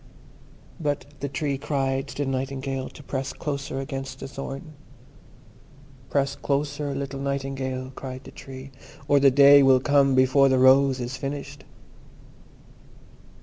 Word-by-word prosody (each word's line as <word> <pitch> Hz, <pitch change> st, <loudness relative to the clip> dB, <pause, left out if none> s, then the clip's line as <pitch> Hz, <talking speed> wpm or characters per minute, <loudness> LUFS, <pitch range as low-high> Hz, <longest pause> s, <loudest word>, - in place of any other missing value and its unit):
But 145 Hz, -4 st, -2 dB
the 140 Hz, -, -3 dB
Tree 140 Hz, 0 st, -2 dB
cried 135 Hz, -2 st, -1 dB
to 145 Hz, -, -3 dB
the 135 Hz, -, -2 dB
Nightingale 135 Hz, 0 st, -3 dB
to 145 Hz, -, -14 dB
press 135 Hz, -1 st, -4 dB
closer 140 Hz, -2 st, -4 dB
against 135 Hz, -1 st, -6 dB
the -, -, -6 dB
thorn. 135 Hz, +3 st, -7 dB, 1.4 s
"Press 140 Hz, -1 st, 0 dB
closer, 145 Hz, 0 st, -2 dB
little 140 Hz, 0 st, -4 dB
Nightingale," 135 Hz, -1 st, -3 dB
cried 130 Hz, 0 st, -7 dB
the -, -, -11 dB
Tree, 135 Hz, 0 st, -10 dB, 0.4 s
"or 145 Hz, -, +5 dB
the 140 Hz, 0 st, +6 dB
Day 140 Hz, +1 st, +7 dB
will 135 Hz, -1 st, +6 dB
come 140 Hz, 0 st, +3 dB
before 130 Hz, +1 st, +5 dB
the 130 Hz, -, +3 dB
rose 130 Hz, +1 st, +5 dB
is 125 Hz, +1 st, -4 dB
finished." 140 Hz, +1 st, -6 dB
135 Hz, 135 wpm, -25 LUFS, 130-140 Hz, 1.4 s, Day